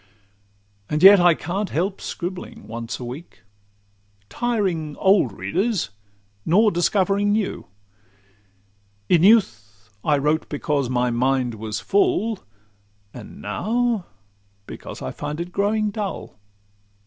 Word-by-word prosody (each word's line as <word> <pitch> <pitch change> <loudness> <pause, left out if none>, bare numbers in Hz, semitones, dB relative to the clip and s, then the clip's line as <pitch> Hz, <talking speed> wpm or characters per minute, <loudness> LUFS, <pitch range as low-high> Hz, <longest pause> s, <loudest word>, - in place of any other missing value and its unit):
And 150 +2 -1
yet 195 0 +10
I 175 -2 +5
can't 190 +6 -3
help 185 +5 -2
scribbling 180 +1 -6
once 115 +1 -6
a 125 - -6
week, 130 +4 -10 0.9
Tiring 190 -11 -1
old 190 - +3
readers, 100 - -1 0.5
nor 210 - +4
discovering 195 +3 +1
new. 210 -2 -2 1.4
In 170 - +5
youth 110 - +2
I 150 -1 +2
wrote 150 +3 0
because 145 -3 -1
my 125 -1 +1
mind 125 0 +1
was 110 0 -5
full, 350 - +1 0.7
And - - -11
now 230 -2 -1 0.6
because - - -9
I 65 - -4
feel 150 +2 -5
it 175 +1 -5
growing 210 +2 0
dull. 200 - -5
175 Hz, 115 wpm, -22 LUFS, 130-205 Hz, 1.4 s, yet